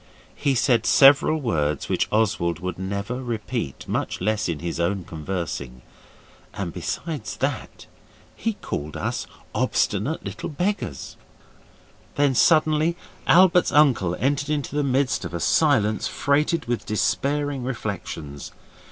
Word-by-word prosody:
He 140 -2 0
said 120 -2 +2
several 145 +3 +6
words 75 - -1
which - - 0
Oswald 105 -6 +1
would 90 0 -5
never 100 +7 -3
repeat, 115 - -4
much - - -2
less 105 +1 0
in 85 - -1
his 85 +1 -4
own 95 +2 0
conversing, 80 -7 -5 0.7
and 90 -4 -4
besides 130 - -4
that - - -3 0.5
he 225 - -1
called 75 - -5
us - - -3 0.3
'obstinate - - 0
little - - -5
beggars'. 175 - -3 1.0
Then 140 -1 +3
suddenly 155 +3 +3 0.3
Albert's 180 0 +5
uncle 125 - +4
entered 140 +2 0
in 150 -2 0
the 145 +2 -2
midst 130 -7 +1
of - - -5
a - - -2
silence 110 - +2
freighted 150 +2 +1
with 120 0 -2
despairing 140 +5 0
reflections. 100 - -5
115 Hz, 125 wpm, -24 LUFS, 90-145 Hz, 1.0 s, several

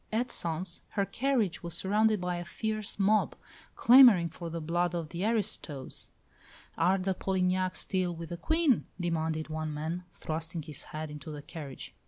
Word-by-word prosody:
At 235 +3 0
Sens 170 +1 -1 0.2
her 200 - +3
carriage 240 -6 0
was 170 -1 -5
surrounded 210 +3 +2
by 180 0 -2
a 175 - -4
fierce 215 +4 -2
mob, 210 +2 +3 0.4
clamouring 235 -9 +8
for 170 +1 -7
the 165 +1 -4
blood 175 +2 0
of 165 -3 -3
the 170 +2 -4
"aristos." 205 - -1 0.7
"Are 180 +4 +3
the 190 0 0
Polignacs 185 0 0
still 185 -3 -1
with 165 -1 -7
the 175 - -5
Queen?" 315 - +2
demanded 160 -2 -1
one 155 0 -3
man, 160 +4 -4
thrusting 160 +1 -4
his 150 -2 -6
head 155 0 -6
into 150 0 -8
the 150 -1 -7
carriage. 145 -3 -8
175 Hz, 165 wpm, -30 LUFS, 160-200 Hz, 0.7 s, clamouring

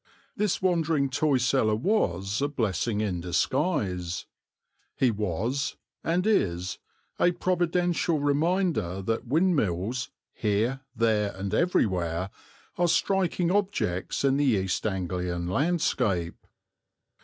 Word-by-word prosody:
This 210 -3 0
wandering 165 -6 +2
toy 145 0 +2
seller 125 -3 +2
was 105 - 0
a 145 - +2
blessing 110 - -1
in 95 -5 -1
disguise. 90 - -1 0.7
He 130 -3 +3
was, 105 +6 -2 0.3
and 175 +3 +1
is, 90 - +1 0.4
a 175 - +4
providential 175 -2 +1
reminder 145 - 0
that 115 +4 -2
windmills, 125 - +1 0.2
here, 110 +5 0 0.2
there, 110 -4 +1
and 95 +1 -4
everywhere, 95 - +1 0.5
are 175 - +4
striking 180 -1 +1
objects 190 - -1
in 135 0 +3
the 145 - +2
East 95 -5 +1
Anglian 90 -2 -2
landscape. 100 - 0
120 Hz, 105 wpm, -27 LUFS, -, 0.7 s, a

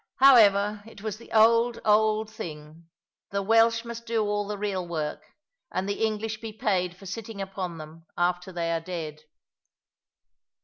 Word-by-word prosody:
However, 210 -6 +6
it 215 -2 -13
was 215 -1 -3
the 235 - -15
old, 230 +2 +4
old 215 0 +3
thing. 155 -4 -9 0.4
The 200 0 -2
Welsh 230 +2 +4
must 235 0 -7
do 225 -1 +1
all 205 -1 -1
the 210 0 -4
real 195 -3 -2
work; 155 -3 -3 0.5
and 190 - -2
the 200 +2 -2
English 220 0 -2
be 225 -1 -5
paid 190 -6 -1
for 195 - -14
sitting 210 +2 -6
upon 190 -3 -4
them 160 +1 -11
after 180 +1 0
they 170 -2 -2
are 165 -1 0
dead. 160 -3 -6
205 Hz, 160 wpm, -27 LUFS, 175-220 Hz, 0.5 s, However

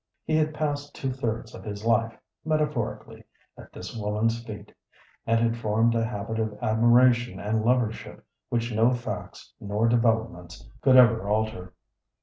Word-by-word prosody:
He 155 - 0
had 155 0 +1
passed 145 -2 -3
two 135 - -3
thirds 115 -4 -4
of - - -10
his 105 0 -7
life, 115 0 +1 0.3
metaphorically, 150 -7 -2 0.3
at - - -14
this - - -9
woman's 110 +2 -1
feet, 110 -3 -10 0.5
and 115 0 +3
had 115 0 +1
formed 115 +1 +1
a 115 -1 +1
habit 110 0 -4
of 110 -1 -2
admiration 120 +2 +3
and 110 +1 -1
lovership 120 -2 -1 0.3
which 120 0 -1
no 115 +4 +3
facts 120 - -7
nor 105 +3 0
developments 115 -6 0
could 130 -1 +5
ever 115 -5 +5
alter. 105 -4 -2
115 Hz, 145 wpm, -26 LUFS, 110-120 Hz, 0.5 s, could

